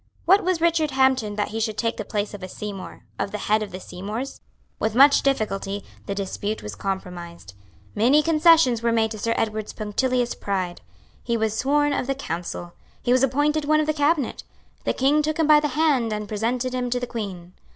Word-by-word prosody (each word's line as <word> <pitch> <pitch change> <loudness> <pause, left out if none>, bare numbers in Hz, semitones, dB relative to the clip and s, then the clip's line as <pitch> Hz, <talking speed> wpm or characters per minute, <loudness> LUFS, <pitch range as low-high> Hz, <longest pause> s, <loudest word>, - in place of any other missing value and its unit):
What 390 +3 +5
was 360 -2 0
Richard 330 -2 +2
Hampden 265 -6 +2
that 205 - -1
he 225 - -4
should 215 -1 -1
take 230 0 -1
the 215 - -3
place 205 0 -3
of 205 - -8
a 185 - -5
Seymour, 200 0 -7 0.2
of - - -1
the 210 - -3
head 215 +1 +1
of 210 - -5
the 185 - -6
Seymours? 210 +10 -6 0.4
With 220 0 -1
much 280 +3 +7
difficulty, 205 -6 -1 0.2
the 200 - -2
dispute 205 +2 -3
was 105 - -6
compromised. 175 - -6 0.4
Many 265 +8 +4
concessions 320 -7 +5
were 235 0 +1
made 220 -1 +2
to 215 - -6
Sir 230 +2 0
Edward's 215 -1 -2
punctilious 245 +3 0
pride. 185 -3 -3 0.4
He 235 -1 -1
was 220 -1 0
sworn 290 +4 +2
of 250 - -2
the 275 - 0
Council. 175 -6 -5 0.3
He 245 - +1
was 255 0 +4
appointed 290 +3 +1
one 305 +1 +3
of 310 - +1
the 310 - +1
Cabinet. 290 -2 0 0.4
The - - +1
King 285 +3 +3
took 310 +1 -1
him 325 - +2
by 300 0 +7
the 300 - 0
hand 275 -8 +2
and 210 0 -3
presented 240 +4 -1
him 250 -1 -1
to 245 +1 0
the 245 - -3
Queen. 190 -7 -6
230 Hz, 205 wpm, -24 LUFS, 205-280 Hz, 0.4 s, much